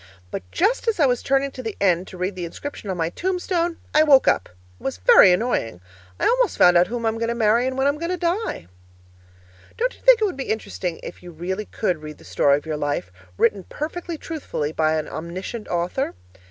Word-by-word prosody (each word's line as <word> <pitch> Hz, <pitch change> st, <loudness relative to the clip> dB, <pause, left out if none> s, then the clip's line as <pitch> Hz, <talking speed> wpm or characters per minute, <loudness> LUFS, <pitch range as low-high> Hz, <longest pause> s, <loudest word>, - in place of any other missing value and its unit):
But -, -, -3 dB
just 480 Hz, -, +1 dB
as 445 Hz, -5 st, +1 dB
I 295 Hz, -, +5 dB
was 245 Hz, -2 st, +1 dB
turning 275 Hz, 0 st, +1 dB
to 255 Hz, -, -8 dB
the 225 Hz, -4 st, -5 dB
end 180 Hz, -2 st, +2 dB
to 185 Hz, -, -10 dB
read 185 Hz, +3 st, -2 dB
the 180 Hz, -, -5 dB
inscription 205 Hz, +5 st, -7 dB
on 185 Hz, -, -2 dB
my 165 Hz, 0 st, -1 dB
tombstone, 355 Hz, -, -1 dB, 0.2 s
I 305 Hz, -, +6 dB
woke 285 Hz, -4 st, +6 dB
up. 95 Hz, -, +2 dB
It 90 Hz, 0 st, -26 dB
was 135 Hz, -, -3 dB
very 95 Hz, -, +7 dB
annoying! 180 Hz, -, 0 dB, 0.4 s
I -, -, 0 dB
almost -, -, +2 dB
found 180 Hz, 0 st, +6 dB
out 175 Hz, +1 st, +5 dB
whom 235 Hz, 0 st, -4 dB
I'm 225 Hz, 0 st, 0 dB
going 230 Hz, -, 0 dB
to 235 Hz, -, -1 dB
marry 230 Hz, +2 st, +3 dB
and 260 Hz, 0 st, -3 dB
when 265 Hz, -, +1 dB
I'm 285 Hz, +1 st, +1 dB
going 335 Hz, +1 st, -3 dB
to 365 Hz, -, -1 dB
die. 350 Hz, -, -2 dB, 1.1 s
Don't -, -, 0 dB
you -, -, -20 dB
think -, -, +6 dB
it 435 Hz, -, +2 dB
would 385 Hz, -, -2 dB
be 270 Hz, -, -3 dB
interesting 185 Hz, -5 st, -3 dB
if -, -, -8 dB
you 180 Hz, -, -10 dB
really 180 Hz, +5 st, -4 dB
could 180 Hz, -7 st, -2 dB
read 150 Hz, -1 st, -8 dB
the -, -, -17 dB
story 140 Hz, 0 st, +3 dB
of 145 Hz, -, -9 dB
your 155 Hz, -1 st, -3 dB
life 145 Hz, -11 st, -2 dB, 0.3 s
written 205 Hz, -4 st, +2 dB
perfectly 330 Hz, +2 st, -5 dB
truthfully 285 Hz, -, -4 dB
by 160 Hz, 0 st, +1 dB
an 155 Hz, -, -3 dB
omniscient 185 Hz, +7 st, -6 dB
author? 175 Hz, +10 st, -2 dB
220 Hz, 225 wpm, -23 LUFS, -, 1.1 s, very